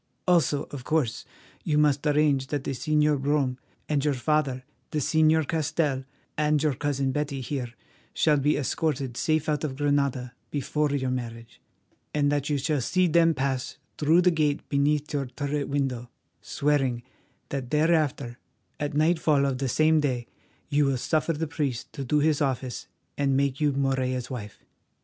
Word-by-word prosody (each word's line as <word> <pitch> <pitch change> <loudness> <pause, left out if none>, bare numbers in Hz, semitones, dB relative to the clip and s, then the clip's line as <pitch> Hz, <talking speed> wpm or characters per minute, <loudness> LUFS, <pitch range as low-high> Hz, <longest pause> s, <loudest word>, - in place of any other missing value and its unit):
Also, 165 -5 +3
of 140 -3 -7
course, 145 -5 0 0.4
you 150 - +1
must 150 -1 +3
arrange 145 -3 +2
that 145 -1 -2
the - - -3
Señor 150 +1 +1
Brome 135 -3 0 0.3
and 145 -3 0
your 150 -2 +1
father, 135 -1 0 0.3
the - - -3
Señor 155 +1 +3
Castell, 150 -4 0 0.3
and 150 0 +1
your 150 -2 +2
cousin 135 -1 -1
Betty 140 0 -2
here 130 -2 -4 0.4
shall 150 -2 +3
be 145 +2 +2
escorted 135 -2 -1
safe 155 +3 0
out 150 -1 0
of 140 -4 -2
Granada 140 -3 0 0.2
before 150 +1 -1
your 135 -2 -1
marriage, 115 -2 -6 0.5
and 145 -1 +2
that 145 0 -1
you 145 - +1
shall 145 0 0
see 185 +8 +2
them 165 -1 +4
pass 130 -1 -2 0.2
through 160 +4 +4
the 180 - +5
gate 150 -3 0
beneath 150 +1 +1
your 140 -2 -1
turret 140 +2 -3
window, 130 -4 -2 0.3
swearing 135 -5 0 0.5
that 135 -3 -4
thereafter, 150 -5 +1 0.4
at 145 -1 -3
nightfall 155 -2 +3
of 135 -2 -1
the 135 -1 -1
same 155 +4 +3
day, 130 -5 -1 0.4
you 145 0 +2
will 135 -1 +1
suffer 155 +5 0
the 160 +1 -2
priest 145 -5 -3
to 140 - -5
do 140 +4 +1
his 150 0 +2
office 130 -3 -2 0.3
and 135 -1 +2
make 140 0 0
you 150 -1 +3
Morella's 130 -2 -1
wife. 105 -5 -8
145 Hz, 165 wpm, -26 LUFS, 130-150 Hz, 0.5 s, the